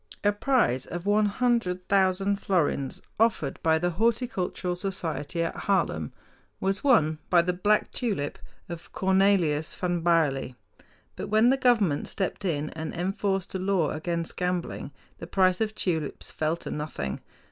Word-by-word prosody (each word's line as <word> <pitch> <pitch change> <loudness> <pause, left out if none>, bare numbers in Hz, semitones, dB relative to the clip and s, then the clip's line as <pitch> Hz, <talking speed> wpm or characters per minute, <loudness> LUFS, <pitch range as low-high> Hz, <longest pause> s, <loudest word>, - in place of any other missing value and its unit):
A 205 - +4
prize 205 - +1
of 175 +1 -6
one 210 +1 +3
hundred 205 -5 0
thousand 195 0 +2
florins 170 -9 -1 0.2
offered 210 -11 +1
by 160 -1 +3
the 175 +2 0
horticultural 210 -3 -1
society 170 -4 -3
at 165 - -3
Haarlem 80 - +1 0.5
was 195 +1 -1
won 160 - +4
by 175 -2 +5
the 180 +1 0
black 205 +4 +1
tulip 200 - -2 0.3
of 170 -1 -8
Cornelius 190 -5 +2
van 175 -2 -1
Baerle. 150 -7 +1 0.6
But - - -5
when 220 +4 +4
the - - +4
government 225 - +2
stepped 195 +1 -3
in 155 -4 -1
and 160 0 -5
enforced 195 +1 -1
a 190 - -2
law 185 -5 +1
against 170 +1 -3
gambling 180 -5 -2 0.3
the 165 - -7
price 185 +1 +2
of 215 -1 -1
tulips 160 -6 -2
fell 155 +2 -1
to - - -7
nothing. 150 - -4
180 Hz, 145 wpm, -27 LUFS, 160-200 Hz, 0.6 s, by